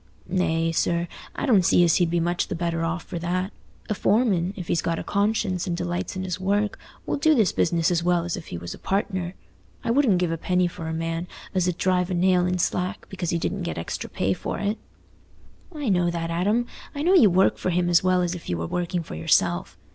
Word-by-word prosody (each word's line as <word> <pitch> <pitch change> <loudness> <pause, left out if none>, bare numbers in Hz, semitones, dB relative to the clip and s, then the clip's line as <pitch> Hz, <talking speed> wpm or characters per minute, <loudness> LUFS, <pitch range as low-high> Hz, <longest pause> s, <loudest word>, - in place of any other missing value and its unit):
"Nay, 165 -3 +1
sir, 170 +1 0 0.3
I - - -2
don't 215 -9 +4
see 175 - +5
as 170 -2 +4
he'd 175 -2 +2
be 170 +1 +1
much 175 +1 0
the - - -3
better 165 -1 -1
off 170 +1 -2
for 170 - -6
that. 185 +3 -2 0.3
A - - 0
foreman, 200 -5 +2
if 180 -4 -6
he's 165 - +1
got 165 0 -1
a - - -4
conscience 200 -3 0
and 170 -1 -1
delights 175 +1 -3
in 185 - -3
his 185 -1 -3
work, 205 +2 0 0.3
will - - -1
do 310 +2 +4
his 220 -7 +3
business 170 0 +2
as 170 -1 +2
well 175 -1 +2
as 175 - -2
if 175 - -8
he 85 - -5
was 85 +1 -6
a - - -12
partner. 190 -2 -2 0.5
I - - 0
wouldn't 240 -7 +4
give 175 -2 0
a 165 - -3
penny 180 +1 +1
for 170 -1 -7
a - - -2
man 165 +1 -3 0.3
as 185 -1 +1
'ud 180 - -3
drive 180 -1 +1
a 185 - -1
nail 180 0 +3
in 180 0 0
slack 180 +3 -1
because 185 -3 -4
he 170 - +1
didn't 195 +3 -2
get 170 - -3
extra 80 - -4
pay 95 +1 0
for - - -4
it." 205 +2 -1 0.9
"I 300 -5 -5
know 180 -4 +3
that, 170 -1 -3
Adam; 205 +8 +1 0.3
I 285 - -2
know 360 +4 +4
you 250 - +7
work 185 +2 +3
for - - -1
him 175 0 +1
as 175 0 +4
well 185 -1 +3
as 175 0 -1
if 175 - -8
you 90 - 0
were 85 - -3
working 175 - -2
for - - -9
yourself. 80 +1 +1
180 Hz, 240 wpm, -25 LUFS, 170-190 Hz, 0.9 s, you